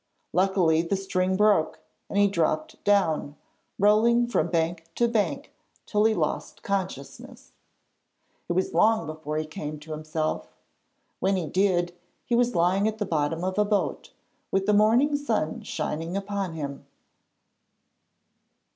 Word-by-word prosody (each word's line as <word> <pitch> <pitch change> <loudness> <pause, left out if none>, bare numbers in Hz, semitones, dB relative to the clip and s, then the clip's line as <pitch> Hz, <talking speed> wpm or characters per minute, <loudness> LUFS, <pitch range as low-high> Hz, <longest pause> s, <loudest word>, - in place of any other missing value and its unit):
Luckily 180 -3 +3
the 170 +4 -1
string 190 -1 0
broke 205 -6 +3 0.3
and - - -3
he 205 0 +5
dropped 165 -5 -1
down, 160 -8 +2 0.4
rolling 225 +4 +4
from 205 -9 0
bank 165 0 -1
to 240 - +2
bank 205 -11 -1 0.3
till 210 +1 +1
he 220 0 +3
lost - - -3
consciousness. 190 -8 -5 1.0
It - - +1
was 185 +2 0
long 220 -4 +3
before 155 -1 -5
he 155 - -1
came 155 -2 -6
to 155 +1 -11
himself. 155 0 -3 0.6
When 195 +1 +1
he 180 -3 -1
did, 175 +1 +1 0.3
he 240 - -3
was 240 -2 +2
lying 180 +4 +3
at 220 0 -2
the 210 - -2
bottom 160 -1 -1
of 185 +2 -1
a - - +5
boat, 205 -1 -1 0.4
with 195 0 0
the 210 - +3
morning 230 +8 +4
sun 225 - -1
shining 165 +4 -3
upon 200 -3 -3
him. 140 -3 -6
190 Hz, 140 wpm, -26 LUFS, 160-210 Hz, 1.0 s, he